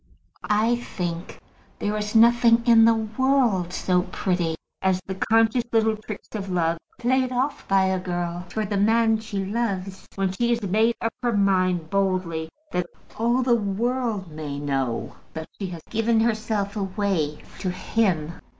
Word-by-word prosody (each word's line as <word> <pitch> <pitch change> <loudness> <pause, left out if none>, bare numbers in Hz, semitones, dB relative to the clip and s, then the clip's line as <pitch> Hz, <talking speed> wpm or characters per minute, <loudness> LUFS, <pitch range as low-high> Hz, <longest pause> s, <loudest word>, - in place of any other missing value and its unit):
I 220 +3 +3
think 175 -7 -5 0.4
there 205 +1 -2
is 210 +1 -3
nothing 235 0 +6
in 230 -2 +7
the 230 0 +5
world 220 -4 +1
so 180 0 +1
pretty 175 -4 0 0.3
as 190 -1 +2
the 190 - -4
conscious 225 +4 +2
little 220 -1 +3
tricks 215 -1 -9
of 200 -3 -4
love 170 -2 0 0.2
played 255 +1 +1
off 260 +3 -2
by 195 -1 +4
a 190 0 +1
girl 175 -1 -3
towards 215 +2 -3
the 200 - +1
man 225 +2 +3
she 205 -3 -4
loves, 195 -3 -3
when 195 -1 0
she 235 +5 0
has 230 - -8
made 220 +4 +2
up 230 - -1
her 240 -2 +1
mind 185 -5 +1
boldly 185 -5 0 0.2
that 180 -1 -1 0.3
all 240 +3 +2
the 245 -1 +3
world 225 -2 -1
may 150 -2 -5
know 135 -4 -2 0.2
that 160 0 -6
she 195 - -3
has 170 -3 -8
given 225 0 +2
herself 215 -2 -1
away 190 -6 -1 0.2
to 185 - -2
him. 180 -4 0
200 Hz, 160 wpm, -24 LUFS, 180-230 Hz, 0.4 s, in